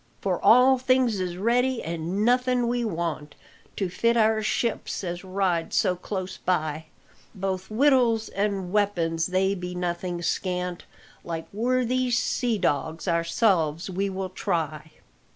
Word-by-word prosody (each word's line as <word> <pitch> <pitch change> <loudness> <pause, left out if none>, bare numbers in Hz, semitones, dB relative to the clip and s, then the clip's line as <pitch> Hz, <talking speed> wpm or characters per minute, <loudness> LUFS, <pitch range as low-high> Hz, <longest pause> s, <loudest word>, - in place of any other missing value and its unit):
"For 185 -3 -2
all 255 +2 +6
things 255 -4 +2
is 180 -1 -3
ready, 245 +5 +1
an' 170 +5 -2
nothing 250 0 +2
we 240 0 0
want, 165 -7 -3 0.4
To 195 - -1
fit 230 +6 +1
out 220 -1 +5
our 220 0 -1
ship 225 +1 -1 0.2
as 175 0 -4
rides 185 -3 -1
so 180 - +2
close 185 +1 -5
by; 155 -3 -1 0.5
Both 190 -1 -3
wittles 235 -2 +3
an' 195 -2 -2
weapons, 170 -6 +1
they 190 +1 +1
be 180 -2 -5
nothing 175 0 -3
scant, 180 0 -2 0.4
Like 165 -1 -5
worthy 255 +3 +1
sea 240 -1 0
dogs 160 0 -1
ourselves 170 -1 +1
we 195 +2 -1
will 190 0 -4
try!" 160 -5 -3
190 Hz, 135 wpm, -25 LUFS, 175-230 Hz, 0.5 s, all